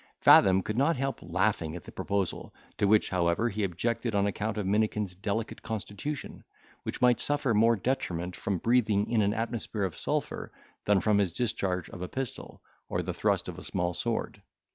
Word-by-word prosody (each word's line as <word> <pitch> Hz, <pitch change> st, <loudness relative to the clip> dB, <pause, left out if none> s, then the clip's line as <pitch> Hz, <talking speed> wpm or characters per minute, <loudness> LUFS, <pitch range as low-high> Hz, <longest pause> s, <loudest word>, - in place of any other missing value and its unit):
Fathom 95 Hz, 0 st, +7 dB
could 105 Hz, +3 st, -2 dB
not 160 Hz, +5 st, +3 dB
help 135 Hz, +1 st, -2 dB
laughing 85 Hz, -2 st, 0 dB
at 90 Hz, -, -7 dB
the -, -, -11 dB
proposal, 100 Hz, -3 st, -2 dB, 0.2 s
to 100 Hz, -, +3 dB
which, 105 Hz, +1 st, +3 dB
however, 90 Hz, +5 st, +1 dB
he 105 Hz, 0 st, -2 dB
objected 110 Hz, +5 st, -1 dB
on 100 Hz, 0 st, +3 dB
account 105 Hz, +1 st, -2 dB
of 105 Hz, -, -1 dB
Minikin's 105 Hz, -1 st, 0 dB
delicate 100 Hz, +4 st, -3 dB
constitution, 110 Hz, +6 st, -5 dB, 0.4 s
which -, -, -5 dB
might 125 Hz, -1 st, +5 dB
suffer 145 Hz, -4 st, +1 dB
more 115 Hz, +2 st, +5 dB
detriment 90 Hz, -6 st, -2 dB
from 100 Hz, -2 st, -2 dB
breathing 110 Hz, -1 st, +2 dB
in 115 Hz, -2 st, +3 dB
an 105 Hz, +1 st, +1 dB
atmosphere 115 Hz, -2 st, -2 dB
of 95 Hz, -4 st, -2 dB
sulphur -, -, -3 dB, 0.3 s
than 100 Hz, -2 st, +4 dB
from 105 Hz, -2 st, +3 dB
the 100 Hz, -, +4 dB
discharge 90 Hz, -2 st, -1 dB
of 90 Hz, -, -8 dB
a 90 Hz, -, -3 dB
pistol, 130 Hz, +1 st, -6 dB, 0.3 s
or -, -, -1 dB
the -, -, -3 dB
thrust -, -, +1 dB
of -, -, -6 dB
a -, -, -10 dB
small 90 Hz, 0 st, -1 dB
sword. 115 Hz, +7 st, -3 dB
105 Hz, 185 wpm, -29 LUFS, 95-115 Hz, 0.4 s, Fathom